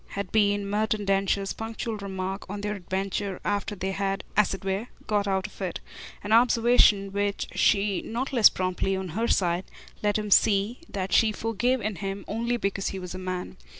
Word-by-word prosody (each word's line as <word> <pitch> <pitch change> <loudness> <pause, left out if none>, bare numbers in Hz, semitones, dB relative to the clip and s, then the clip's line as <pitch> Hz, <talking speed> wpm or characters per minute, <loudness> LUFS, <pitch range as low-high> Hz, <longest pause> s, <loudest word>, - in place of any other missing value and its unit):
had 200 -2 -5
been 205 -2 +2
Merton 210 0 0
Densher's 195 0 +1
punctual 225 0 -4
remark 195 -1 -4
on 205 +1 -5
their 210 0 -2
adventure 195 0 -3
after 205 0 -1
they 190 0 -3
had, 195 0 -2
as 210 -1 +4
it 195 0 -5
were, 195 +4 -1 0.2
got 205 -1 0
out 190 0 0
of 205 - -10
it; 180 -3 -3 0.4
an 205 - -4
observation 230 -4 +5
which 200 0 -1
she 200 -2 +2
not 255 +5 -4
less 230 -5 +8
promptly, 185 +1 -1
on 190 -1 -4
her 225 +8 -1
side, 175 -3 +1 0.4
let 205 0 +2
him 210 -1 -4
see 205 +4 +4
that 190 -1 -3
she 225 -1 +5
forgave 230 +4 0
in 210 -3 -3
him 195 +3 -4
only 235 +3 -1
because 195 -3 -2
he 195 - -3
was 180 -1 -6
a 185 - -6
man. 185 -1 -5
200 Hz, 185 wpm, -26 LUFS, 195-215 Hz, 0.4 s, less